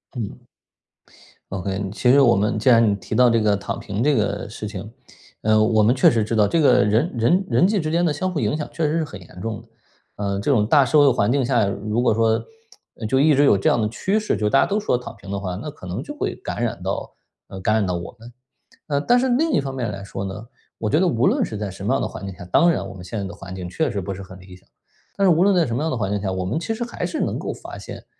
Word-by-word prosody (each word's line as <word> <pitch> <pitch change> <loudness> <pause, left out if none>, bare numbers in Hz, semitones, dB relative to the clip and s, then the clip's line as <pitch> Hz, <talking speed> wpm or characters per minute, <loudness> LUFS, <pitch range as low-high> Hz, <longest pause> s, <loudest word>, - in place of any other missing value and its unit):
嗯。 110 -5 -5 1.1
OK， 95 +1 -3
嗯， 95 0 -3
其 125 +4 +2
实 140 - +6
我 120 -6 +5
们 105 +2 0
既 120 - +2
然 115 -3 +5
你 - - +1
提 100 +2 -6
到 125 +2 +6
这 115 -1 +3
个 105 -1 +2
躺 100 - -5
平 100 +4 -3
这 150 +2 +3
个 105 0 -1
事 105 0 -7
情， 105 0 -7 0.5
呃， 110 0 +3
我 110 0 +3
们 115 +4 +4
确 130 - +6
实 115 -2 +1
知 110 +2 -2
道， 105 -2 +4
这 165 - +1
个 145 - +5
人 110 +11 +1
人 170 - +3
人 - - +4
际 205 0 +1
之 155 -3 -2
间 170 +2 +1
的 155 - +1
相 185 +6 -2
互 170 - -2
影 110 -1 0
响， 150 -1 -4
确 165 - -1
实 150 +2 +1
是 - - 0
很 145 -10 -8
严 90 0 -13
重 110 0 -4
的。 115 - -21 0.5
呃， 100 -1 -2
这 100 - 0
种 105 -6 +2
大 140 +3 +5
社 150 +4 +3
会 145 -1 +6
环 115 -2 +1
境 135 0 +2
下， 120 -4 +2
如 105 +4 -2
果 120 - +3
说 110 0 +1 0.6
呃， 110 - -3
就 130 +4 +2
一 150 +2 +5
直 145 +1 +4
有 105 - +5
这 95 - -1
样 120 - +3
的 105 - 0
趋 195 - 0
势， 215 - -1
就 105 - 0
大 105 - +4
家 - - +4
都 205 +1 0
说 210 - 0
躺 125 - -6
平 100 - -11
的 100 - -2
话， 95 -2 -4
那 125 +11 -6
可 115 -10 -12
能 90 - -4
就 - - -8
会 - - -3
感 - - -5
染 - - -3
到 - - -4 0.3
呃， 95 - -9
感 105 +3 +1
染 110 -2 +2
到 90 - -1
我 85 +6 -7
们。 115 +2 -12 0.5
呃， 145 -2 -1
但 245 +10 +3
是 260 +1 +1
另 295 +6 +2
一 - - +3
方 135 -1 -4
面 120 -5 -2
来 100 -1 -7
说 100 -1 -6
呢， 100 +3 -6 0.3
我 110 - -3
觉 150 +8 +2
得 185 - +3
无 125 -6 +1
论 - - +2
是 110 - -4
在 100 -1 -4
什 95 +1 -10
么 120 +7 +1
样 - - 0
的 - - -1
环 100 - -8
境 95 - -7
下 90 -1 -10
当 170 - +4
然 155 -12 -1
我 95 - -9
们 90 -1 -10
现 95 +5 -6
在 100 - -3
的 95 - -7
环 95 -1 -9
境， 90 -2 -6
确 155 - -1
实 105 -5 -3
不 95 +2 -4
是 95 - -8
很 95 -1 -11
理 90 0 -13
想， 90 - -22 0.5
但 195 - +3
是 180 - +6
无 165 +3 +3
论 200 0 +4
在 175 -3 +3
什 115 - -3
么 125 - -1
样 160 - 0
的 130 - -2
环 100 -3 -2
境 105 -1 -1
下， 95 -2 -2
我 95 0 -3
们 110 - -1
其 225 +7 -3
实 240 - -3
还 235 - -4
是 - - -4
能 - - -1
够 - - -4
发 - - -9
现， - - -9
110 Hz, 330 characters per minute, -22 LUFS, 100-145 Hz, 1.1 s, 实